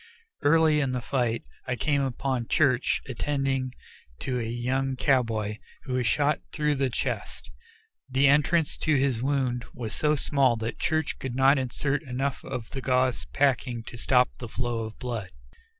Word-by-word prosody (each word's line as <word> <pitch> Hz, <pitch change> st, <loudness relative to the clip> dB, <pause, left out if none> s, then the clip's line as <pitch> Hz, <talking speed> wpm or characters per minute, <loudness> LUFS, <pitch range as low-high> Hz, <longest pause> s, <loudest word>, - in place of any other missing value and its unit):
Early 155 Hz, 0 st, +4 dB
in 135 Hz, -3 st, 0 dB
the 125 Hz, -, -1 dB
fight 120 Hz, -2 st, -1 dB, 0.2 s
I 125 Hz, -, 0 dB
came 145 Hz, +2 st, +1 dB
upon 130 Hz, -2 st, -1 dB
Church 130 Hz, -5 st, +2 dB
attending 135 Hz, 0 st, -1 dB, 0.5 s
to 125 Hz, -1 st, -1 dB
a 115 Hz, -1 st, -3 dB
young 130 Hz, +3 st, -1 dB
cowboy, 115 Hz, -6 st, +1 dB, 0.3 s
who 130 Hz, -, -5 dB
was 125 Hz, -2 st, +1 dB
shot 145 Hz, +5 st, +2 dB
through 150 Hz, -1 st, +1 dB
the 135 Hz, -2 st, 0 dB
chest. 70 Hz, -, -4 dB, 0.6 s
The 135 Hz, +2 st, +4 dB
entrance 150 Hz, +3 st, +3 dB
to 155 Hz, -2 st, +1 dB
his 135 Hz, -4 st, +1 dB
wound 130 Hz, -3 st, 0 dB
was 115 Hz, -4 st, -4 dB
so 150 Hz, 0 st, +2 dB
small 135 Hz, -4 st, +2 dB
that 115 Hz, +1 st, -4 dB
Church 155 Hz, -2 st, 0 dB
could 130 Hz, -2 st, -4 dB
not 135 Hz, +2 st, +5 dB
insert 140 Hz, +3 st, -1 dB
enough 135 Hz, -1 st, -3 dB
of 125 Hz, -4 st, -6 dB
the 135 Hz, -, -4 dB
gauze 130 Hz, -1 st, +1 dB
packing 125 Hz, -4 st, 0 dB
to 120 Hz, -, -9 dB
stop 125 Hz, +1 st, +3 dB
the 120 Hz, -, -6 dB
flow 120 Hz, -1 st, -2 dB
of 110 Hz, -, -9 dB
blood. 115 Hz, -7 st, -4 dB
130 Hz, 165 wpm, -27 LUFS, 120-140 Hz, 0.6 s, not